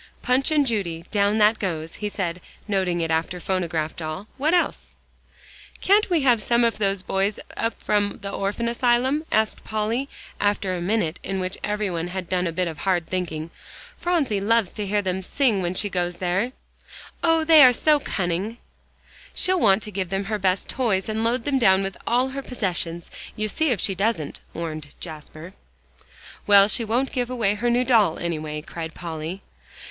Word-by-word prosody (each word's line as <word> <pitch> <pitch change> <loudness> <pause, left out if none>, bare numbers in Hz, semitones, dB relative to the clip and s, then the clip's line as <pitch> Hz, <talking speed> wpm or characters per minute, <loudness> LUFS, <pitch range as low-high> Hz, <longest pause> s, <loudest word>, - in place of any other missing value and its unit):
"'Punch 255 +3 +2
and 300 -2 +3
Judy,' 175 -9 -2
down 205 +1 +2
that 215 +1 +4
goes," 165 -4 -3
he 210 -1 -3
said, 180 -3 -3 0.3
noting 185 -4 0
it 165 0 -1
after 165 +3 -1
"phonograph 165 -4 -2
doll." 155 +4 -5
"What 295 +4 +1
else?" 350 - -1 0.8
"Can't 405 +2 +3
we 340 -4 +2
have 245 -4 +4
some 235 +3 +2
of 230 -2 +1
those 195 -2 0
boys 195 +2 0 0.2
up 230 0 -1
from 205 -1 0
the 200 - -4
Orphan 200 +4 -2
Asylum?" 250 +5 +1
asked 220 0 +1
Polly, 220 +5 -2 0.3
after 205 -2 +1
a 175 - -3
minute 180 -3 0
in 195 0 -3
which 185 +1 -2
everybody 200 -5 -1
had 180 0 -5
done 180 0 0
a - - -1
bit 180 +2 -1
of 160 -3 -6
hard 180 -2 +1
thinking. 165 -3 -3 0.4
"Phronsie 295 - 0
loves 225 -1 +2
to 210 -2 -4
hear 205 +1 +1
them 190 0 -1
sing 225 0 +1
when 175 0 -2
she 205 - +1
goes 175 -2 -2
there. 190 +8 -1 0.7
Oh! 325 -1 +4
they 315 -2 +8
are 255 - +9
so 300 +4 +3
cunning." 190 0 -2 0.8
"She'll 370 0 +2
want 200 -4 +4
to 210 - -6
give 190 -2 -3
them 195 +1 -1
her 210 +1 -2
best 185 0 +1
toys 220 -6 0
and 220 +1 -1
load 230 +1 +1
them 275 0 +1
down 190 -4 +4
with 195 0 -4
all 250 +2 +2
her 275 +1 -5
possessions. 175 -9 -3 0.2
You 215 0 -1
see 315 +9 0
if 235 -6 +1
she 195 - 0
doesn't," 195 -5 -1
warned 155 -3 -6
Jasper. 155 +2 -9 0.9
"Well, 200 -1 +8
she 230 - +2
won't 240 +5 0
give 245 -1 -1
away 230 -5 +1
her 235 +4 -1
new 240 +1 +3
doll, 220 -10 +4
anyway," 155 -3 -3
cried 165 0 -7
Polly. 165 +2 -6
200 Hz, 185 wpm, -24 LUFS, 175-235 Hz, 0.9 s, are